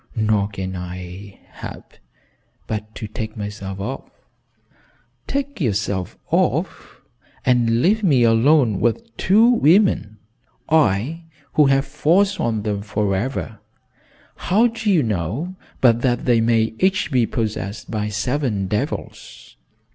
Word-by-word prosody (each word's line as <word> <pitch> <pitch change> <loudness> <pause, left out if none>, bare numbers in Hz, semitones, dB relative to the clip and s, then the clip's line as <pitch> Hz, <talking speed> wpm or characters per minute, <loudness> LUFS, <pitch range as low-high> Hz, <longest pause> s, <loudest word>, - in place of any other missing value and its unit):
"Nor 110 -2 +1
can 95 -2 -5
I 90 +2 -8
help - - -10 0.7
but 110 0 -5
to 110 - -6
take 110 +1 -6
myself 100 -2 -6
off." 125 +8 -5 1.2
"Take 280 -5 -3
yourself 100 - -1
off! - - -1 0.4
And 120 -1 +2
leave 215 +4 +3
me 140 -10 +4
alone 115 -1 +4
with 230 - -1
two 215 +5 +4
women? 185 - +3 0.5
I 155 - +1 0.3
who 150 -2 +5
have 135 +1 +3
foresworn 165 - +1
them 105 -2 -2
forever! 105 +2 -2 0.8
How 210 +6 +2
do 225 -2 -1
you 175 -7 +4
know 110 - -3 0.3
but 120 -2 +4
that 120 -2 0
they 120 -2 +3
may 115 -1 +2
each 190 -3 +1
be 125 -4 +2
possessed 105 -2 -4
by 105 -1 -2
seven 110 -1 -1
devils? 105 +2 -5
115 Hz, 115 wpm, -21 LUFS, 105-150 Hz, 1.2 s, who